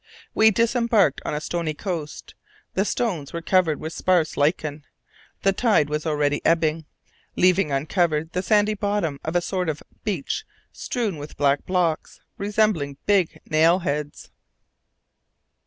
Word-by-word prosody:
We 220 Hz, 0 st, +6 dB
disembarked 230 Hz, -, +2 dB
on -, -, -2 dB
a -, -, -1 dB
stony 160 Hz, 0 st, -3 dB
coast. 165 Hz, -4 st, -5 dB, 0.4 s
The 195 Hz, -, +1 dB
stones 180 Hz, -, -2 dB
were 170 Hz, -, -3 dB
covered 175 Hz, -4 st, +2 dB
with 160 Hz, +1 st, -6 dB
sparse 180 Hz, -4 st, +1 dB
lichen. 150 Hz, 0 st, 0 dB, 0.6 s
The 195 Hz, -, +3 dB
tide 205 Hz, -9 st, +2 dB
was 150 Hz, +2 st, -2 dB
already 145 Hz, -1 st, 0 dB
ebbing, 160 Hz, -1 st, +1 dB, 0.5 s
leaving 180 Hz, -3 st, +3 dB
uncovered 155 Hz, +2 st, 0 dB
the 180 Hz, -, -1 dB
sandy 210 Hz, +1 st, +3 dB
bottom 200 Hz, -8 st, -1 dB
of 160 Hz, -, -4 dB
a 175 Hz, -, +3 dB
sort 180 Hz, -1 st, -2 dB
of 150 Hz, -2 st, -4 dB, 0.2 s
beach 185 Hz, -10 st, -2 dB, 0.3 s
strewn 220 Hz, -9 st, -3 dB
with 145 Hz, +1 st, -9 dB
black 140 Hz, 0 st, +1 dB
blocks, 175 Hz, -4 st, -1 dB, 0.2 s
resembling 200 Hz, -9 st, 0 dB
big 195 Hz, -5 st, +1 dB
nail 160 Hz, +3 st, +4 dB
heads. 150 Hz, -5 st, -4 dB
170 Hz, 140 wpm, -23 LUFS, 150-195 Hz, 0.6 s, We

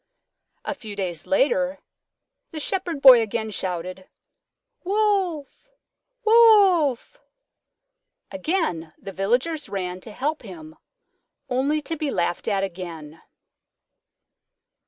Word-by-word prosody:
A -, -, -2 dB
few 220 Hz, -7 st, -9 dB
days 180 Hz, -5 st, -4 dB
later 280 Hz, 0 st, +1 dB, 0.7 s
the 315 Hz, -, -7 dB
Shepherd 345 Hz, -3 st, -2 dB
Boy 255 Hz, -3 st, +9 dB
again 220 Hz, 0 st, -3 dB
shouted, 185 Hz, -1 st, -5 dB, 0.7 s
"Wolf! 390 Hz, -, -1 dB, 0.6 s
Wolf!" 400 Hz, -, +4 dB, 1.1 s
Again 285 Hz, -, -2 dB
the 195 Hz, -, -9 dB
Villagers 245 Hz, -, -1 dB
ran 185 Hz, -2 st, -4 dB
to 220 Hz, -, -9 dB
help 295 Hz, +8 st, -3 dB
him, 160 Hz, -8 st, -11 dB, 0.7 s
only 275 Hz, +4 st, 0 dB
to 325 Hz, -, -3 dB
be 305 Hz, -2 st, -3 dB
laughed 175 Hz, -6 st, -2 dB
at 195 Hz, -2 st, 0 dB
again. 170 Hz, -4 st, -7 dB
255 Hz, 95 wpm, -23 LUFS, -, 1.1 s, Boy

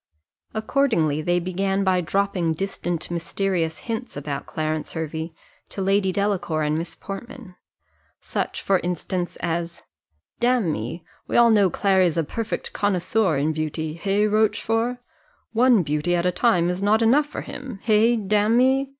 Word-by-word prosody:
Accordingly 220 Hz, -, +1 dB
they 175 Hz, +3 st, +1 dB
began 195 Hz, +2 st, -1 dB
by 185 Hz, -2 st, +2 dB
dropping 180 Hz, -2 st, 0 dB
distant 175 Hz, -2 st, -3 dB
mysterious 170 Hz, -1 st, -1 dB
hints 230 Hz, -, -4 dB
about 145 Hz, -1 st, -4 dB
Clarence 155 Hz, -1 st, -3 dB
Hervey 160 Hz, +1 st, -4 dB, 0.4 s
to -, -, -8 dB
Lady 195 Hz, 0 st, +2 dB
Delacour 180 Hz, -5 st, 0 dB
and 150 Hz, 0 st, 0 dB
Miss 165 Hz, +2 st, -4 dB
Portman. 205 Hz, 0 st, -9 dB, 0.6 s
Such -, -, -3 dB
for 195 Hz, -2 st, +3 dB
instance 175 Hz, +1 st, -3 dB
as 170 Hz, 0 st, -3 dB, 0.6 s
"Damme, 175 Hz, -, 0 dB, 0.3 s
we -, -, 0 dB
all 235 Hz, -1 st, +6 dB
know 205 Hz, -3 st, +5 dB
Clary's 185 Hz, -2 st, +2 dB
a 165 Hz, -, +2 dB
perfect 225 Hz, +9 st, -4 dB
connoisseur 195 Hz, -3 st, +1 dB
in 150 Hz, +3 st, +1 dB
beauty 155 Hz, 0 st, -3 dB
hey, 200 Hz, +5 st, +1 dB
Rochfort? 225 Hz, +3 st, +1 dB, 0.6 s
one 235 Hz, -3 st, +4 dB
beauty 150 Hz, +4 st, 0 dB
at 175 Hz, 0 st, 0 dB
a 180 Hz, -, +3 dB
time 180 Hz, -3 st, +2 dB
is 180 Hz, +2 st, -4 dB
not 215 Hz, +3 st, +3 dB
enough 280 Hz, +6 st, +4 dB
for 295 Hz, -, -6 dB
him 255 Hz, -6 st, -8 dB
hey, 225 Hz, +2 st, +4 dB
damme? 230 Hz, +6 st, +2 dB
190 Hz, 140 wpm, -23 LUFS, 165-220 Hz, 0.6 s, all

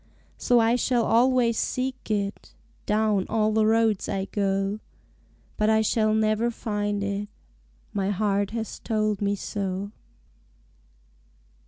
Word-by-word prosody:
So 245 Hz, -, +2 dB
I 230 Hz, +2 st, +3 dB
shall 245 Hz, -1 st, +1 dB
always 240 Hz, -1 st, +3 dB
seek 255 Hz, -1 st, -3 dB
it 200 Hz, -1 st, -3 dB, 0.3 s
Down 210 Hz, -2 st, +1 dB
all 215 Hz, -1 st, +1 dB
the 215 Hz, 0 st, +2 dB
roads 225 Hz, -2 st, +2 dB
I 195 Hz, -1 st, -1 dB
go, 195 Hz, 0 st, -1 dB, 0.8 s
But 215 Hz, 0 st, +2 dB
I 220 Hz, 0 st, +4 dB
shall 215 Hz, 0 st, +2 dB
never 220 Hz, +2 st, +1 dB
find 205 Hz, -3 st, -2 dB
it; 200 Hz, +1 st, -3 dB, 0.7 s
My 195 Hz, -1 st, -1 dB
heart 200 Hz, 0 st, 0 dB
has 225 Hz, 0 st, -5 dB
told 215 Hz, -2 st, -1 dB
me 200 Hz, 0 st, +1 dB
so. 195 Hz, 0 st, -4 dB
215 Hz, 125 wpm, -25 LUFS, 200-225 Hz, 0.8 s, I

